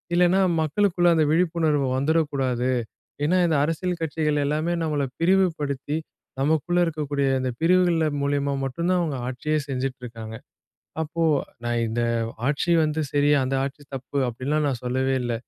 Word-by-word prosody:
இல்லேனா, 180 +2 +4 0.2
மக்களுக்குள்ள 175 +1 +2
அத 155 - +3
விழிப்புணர்வு 160 -5 +2
வந்துறக்கூடாது. 135 -4 0 0.5
ஏன்னா, 180 +4 +3
இந்த 160 -3 +2
அரசியல் 170 +3 -2
கட்சிகள் 150 -1 0
எல்லாமே 155 +4 0
நம்மள 150 -3 0
பிரிவு 190 +3 +4
படுத்தி, 145 +1 -2 0.4
நமக்குள்ள 160 +4 +1
இருக்கக்கூடிய 145 -3 -1
இந்த 130 -1 -1
பிரிவுகள்ல 175 -2 +3 0.2
மூலியமா 140 0 0
மட்டும் 170 +7 -2
தான் 180 -1 +3
அவங்க 150 -6 -2
ஆட்சியே 150 +5 -1
செஞ்சுட்ருக்காங்க. 125 -4 -5 0.7
அப்போ, 165 +2 -2 0.4
நான் 120 0 0
"இந்த 115 +2 -1 0.5
ஆட்சி 150 +4 0
வந்து 155 +1 -1
சரி, 145 0 +2 0.2
அந்த 130 - -2
ஆட்சி 140 +1 -5
தப்பு." 135 +2 -6
அப்டின்லாம் 140 +6 -1
நான் 130 -4 -2
சொல்லவே 130 +2 0
இல்ல. 120 -1 -1
150 Hz, 140 wpm, -24 LUFS, 135-165 Hz, 0.7 s, இல்லேனா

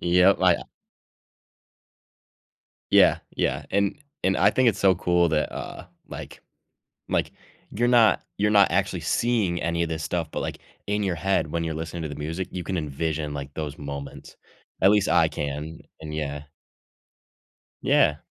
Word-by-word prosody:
Yup, 90 +2 +4
I, 90 -2 +6
uh - - -5 2.3
Yeah, - - +6 0.2
yeah, 70 +2 0
and 100 +6 +1 0.3
and 95 +1 +2
I 100 +2 +5
think 130 +2 +3
it's 105 -3 0
so 95 -2 +4
cool 90 0 +2
that, 75 -1 0
uh, - - -7 0.2
like - - -9 0.7
like - - 0 0.4
you're 120 +3 0
not 120 -3 +5 0.2
you're 105 +1 +2
not 100 -4 +5
actually 95 0 0
seeing 95 +2 0
any 85 +1 0
of 85 - -1
this 80 -1 -3
stuff, 80 0 -2
but - - -4
like - - -4 0.3
in 105 +1 0
your 95 -3 0
head 85 -3 0
when 85 0 -1
you're 80 -1 -3
listening 80 +1 -5
to - - -3
the 75 - -6
music, 80 +6 -4
you 90 -1 -5
can 95 -2 -2
envision 75 0 -3
like 70 0 -6
those 75 -2 -5
moments; 70 -1 -8 0.4
at 95 - +6
least 105 -1 +3
I - - +4
can, 75 +3 -5 0.2
and 75 -1 -7
yeah. 75 -1 -4 1.4
Yeah. 75 - +4
85 Hz, 165 wpm, -25 LUFS, 75-95 Hz, 2.3 s, I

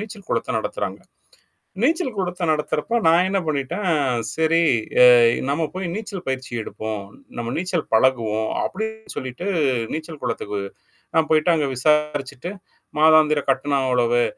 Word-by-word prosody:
நீச்சல் 210 -2 -9
குளத்த - - -1
நடத்துறாங்க. - - -4 0.8
நீச்சல் 310 -3 +1
குளத்த 180 -1 -3
நடத்துறப்ப 155 +8 0
நான் 170 +3 +5
என்ன 195 +1 +1
பண்ணிட்டேன் 155 +6 -2 0.5
சரி 160 +1 +3 0.4
அ - - +10 0.4
நம்ம 155 +3 0
போய் 185 -1 -3
நீச்சல் 205 -6 -6
பயிற்சி 130 -1 -4
எடுப்போம். 110 -2 -5 0.3
நம்ம 120 0 -3
நீச்சல் 180 -2 -2
பழகுவோம். 110 -3 +2
அப்படின்னு 220 +2 -5
சொல்லிட்டு 130 +7 -5 0.5
நீச்சல் 155 -1 -6
குளத்துக்கு 105 0 -3 0.5
நான் 160 -1 +2
போயிட்டு 155 +2 +4
அங்க 145 -3 0
விசாரிச்சுட்டு 150 +2 0 0.5
மாதாந்திர 155 -1 +5
கட்டணம் 135 0 0
அவ்வளவு. 120 -1 +2
155 Hz, 125 wpm, -22 LUFS, 130-180 Hz, 0.8 s, அ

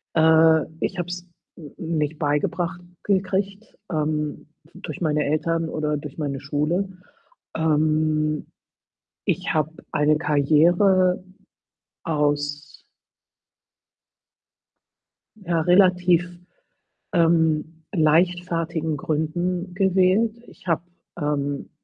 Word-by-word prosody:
Äh, 160 0 +5 0.2
ich 190 - -2
habe 175 -1 -2
es 180 0 -6 0.3
n 150 -5 -11 0.2
nicht 150 +1 -1
beigebracht 165 +3 -1 0.2
gekriegt, 195 +2 -1
ähm, 150 -1 -2 0.3
durch 155 - -8
meine 150 -2 +1
Eltern 165 +2 0
oder 150 -1 -1
durch 145 -1 -9
meine 140 -3 -3
Schule. 150 +7 -1 0.7
Ähm, 155 -1 +1 0.8
ich - - -1
habe 155 0 +1 0.2
eine 150 +1 +3
Karriere 175 +6 +3 0.8
aus 145 -2 -1 2.6
ja, 170 -5 -1
relativ, 180 0 +4 0.8
ähm, 165 -2 +2
leichtfertigen 165 -1 +1
Gründen 175 +5 -2
gewählt. 190 +4 +2
Ich - - -17
habe, 165 -1 +1 0.4
ähm 145 -1 -2
160 Hz, 85 wpm, -23 LUFS, 150-180 Hz, 2.6 s, Äh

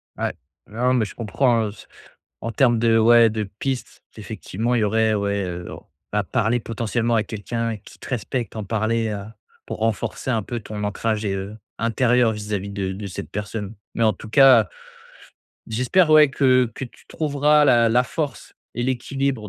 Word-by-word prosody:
Ouais. - - -2 0.3
Non, 125 +4 0
mais 120 -4 +2
je - - -10
comprends 115 +1 +1
hein, - - -3
s - - -15 0.6
en 115 - -2
termes 120 0 +3
de 115 -1 +3
ouais, 115 +1 +6
de 110 0 -2 0.2
piste, 135 -2 -4 0.2
effectivement 110 +2 -3
il 120 - +3
y - - +2
aurait, 110 +1 +2
ouais, 100 -1 0
heu, 90 0 -6
o - - -10 0.3
à 105 -1 +1
parler 115 +3 0
potentiellement 115 +1 -1
à 110 - +2
quelqu'un 115 +1 -3
qui 100 - -16
te - - -10
respecte, 120 0 -3
en 110 - -4
parler 110 +2 0
à 105 +1 -6 0.3
pour - - -5
renforcer 115 +3 -1
un 115 -2 +1
peu 120 +3 -4
ton 105 -1 -6
ancrage 110 +1 -1
et 100 -2 -1
heu, 95 +2 -5 0.2
intérieur 120 +1 +2
vis-à-vis 105 -2 -4
de 100 -2 -3
de 100 +1 -6
cette 90 - -7
personne. 105 +1 -5 0.2
Mais 115 - 0
en 110 -1 +4
tout 110 +4 -11
cas, 120 -5 +6 1.0
j'espère 130 +9 +2
ouais, 155 -1 +7
que 130 -3 +3
que 135 - -5
tu 120 - -15
trouveras 150 0 +2
la 120 -4 +5
la 120 +2 +4
force 145 -4 -4 0.2
et 120 - -2
l'équilibre 130 -2 -2
115 Hz, 185 wpm, -22 LUFS, 105-125 Hz, 1.0 s, ouais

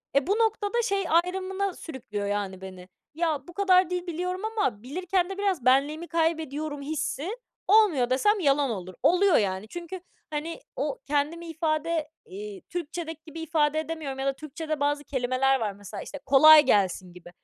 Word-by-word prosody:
E, 280 -1 +3
bu 390 - +1
noktada 445 0 +1
şey 395 -3 0
ayrımına 375 +3 0
sürüklüyor, 220 - -6
yani, 200 -2 -3
beni; 185 -1 -10 0.2
ya, 310 -3 -1
bu 350 - -11
kadar 370 -2 +4
dil 360 0 -3
biliyorum 360 +2 -3
ama 415 - -1
bilirken 360 +6 -1
de 390 - -5
biraz 385 -10 -1
benliğimi 285 +6 +2
kaybediyorum 310 -3 -1
hissi 295 +1 -3 0.4
olmuyor 380 - +4
desem, 415 +12 +3
yalan 280 -4 +2
olur. 185 -4 -5
Oluyor 365 0 +4
yani. 195 0 -1
Çünkü, 345 +6 -7 0.3
hani, 310 +2 -4 0.2
o - - -2
kendimi 300 +4 -1
ifade, 320 -1 -1 0.2
iii, 405 -1 -8
Türkçedeki 330 -2 -5
gibi 325 0 -9
ifade 310 -2 +1
edemiyorum 315 -4 -5
ya 270 - -2
da 275 - +2
Türkçede 310 +1 -5
bazı 290 0 0
kelimeler 265 0 +1
var 215 -3 -1
mesela, 200 0 -9
işte, 290 - -8
"Kolay 300 +3 +8
gelsin." 190 -5 +1
gibi. 180 -1 -13
310 Hz, 160 wpm, -27 LUFS, 270-360 Hz, 0.4 s, Kolay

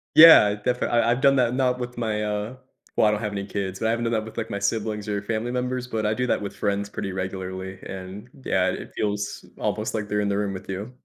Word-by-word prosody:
Yeah, 155 -11 +10
definitely 120 +4 -1
I 120 0 +3
I've 125 +2 0
done 135 0 +5
that, 125 -2 +2
not 125 -1 +1
with 125 0 -5
my, 110 -2 -1
uh 105 +3 -2 0.4
well, - - +4
I - - +4
don't 105 0 -1
have 105 -2 -2
any 100 -1 -3
kids, 95 -2 -4
but 110 - 0
I - - +3
haven't 115 +1 -1
done 115 - 0
that 110 -1 0
with, 110 - -10
like, 115 -1 -3
my 100 - -3
siblings 105 +1 -1
or 100 -1 -1
family 110 +3 -2
members, 125 0 -2
but 110 -3 -2
I 105 - +2
do 125 +3 -1
that - - +1
with 100 - -5
friends 100 0 -1
pretty 100 -2 -4
regularly, 95 0 -5
and 95 +2 -8
yeah, - - +2
it - - -7
feels 105 -1 -2
almost 110 +1 -2
like 105 -2 -3
they're 105 - 0
in 105 - 0
the 100 0 0
room 100 -1 -1
with 95 0 -8
you. 100 +5 -4
105 Hz, 260 wpm, -25 LUFS, 100-120 Hz, 0.4 s, Yeah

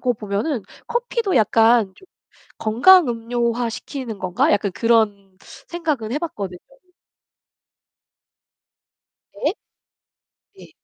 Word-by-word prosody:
거 250 -1 +1
보면은 215 +4 -3 0.3
커피도 470 -4 -1
약간 225 -2 +3
좀 380 - -19 0.5
'건강 275 +8 +5
음료화 235 0 -1
시키는 235 -2 -7
건가?' 185 -1 +1
약간 205 -1 0
그런 205 -3 +1 0.3
생각은 300 -10 -2
해 290 - -1
봤거든요. 200 - -5 2.8
네. - - +1 1.0
네. - - -15
230 Hz, 190 characters per minute, -21 LUFS, 205-285 Hz, 2.8 s, 건강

